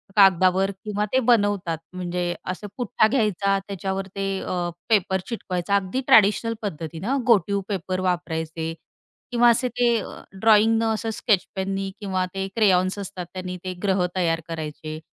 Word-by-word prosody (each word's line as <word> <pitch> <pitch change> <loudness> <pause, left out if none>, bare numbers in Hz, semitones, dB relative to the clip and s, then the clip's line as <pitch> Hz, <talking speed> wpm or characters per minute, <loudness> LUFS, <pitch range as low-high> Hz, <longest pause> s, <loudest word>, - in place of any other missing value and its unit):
कागदावर 190 0 +5
किंवा 210 0 -1
ते 260 - +5
बनवतात 205 -7 +2 0.2
म्हणजे 175 -1 -2 0.2
असे 205 +3 -7
पुठ्ठा 220 -2 +2
घ्यायचा 205 -5 +1
त्याच्यावर 195 0 -3
ते 195 0 -2
अ, 175 -1 -2 0.2
पेपर 190 -3 +2
चिटकवायचा. 200 -5 -2
अगदी 200 +7 0
ट्रॅडिशनल 220 +2 +5
पद्धतीने 170 - -3
घोटीव 200 -4 +3
पेपर 185 -1 -2
वापरायचे 160 -2 -2 0.6
किंवा 240 0 +5
असे 235 +2 +2
ते 245 +1 +1
अ, - - -8 0.2
ड्रॉइंग 225 +1 +5
ने 225 - +1
असं 225 +1 -2
स्केचपेन 195 -2 0
नी 195 0 -2
किंवा 190 -3 -1
ते 195 0 -2
क्रेयॉन्स 190 -3 +3
असतात 190 -2 -6
त्यांनी 180 -1 -5
ते 185 - -3
ग्रह 190 -2 +2
तयार 165 -2 +1
करायचे. 155 -1 -5
195 Hz, 145 wpm, -24 LUFS, 180-210 Hz, 0.6 s, कागदावर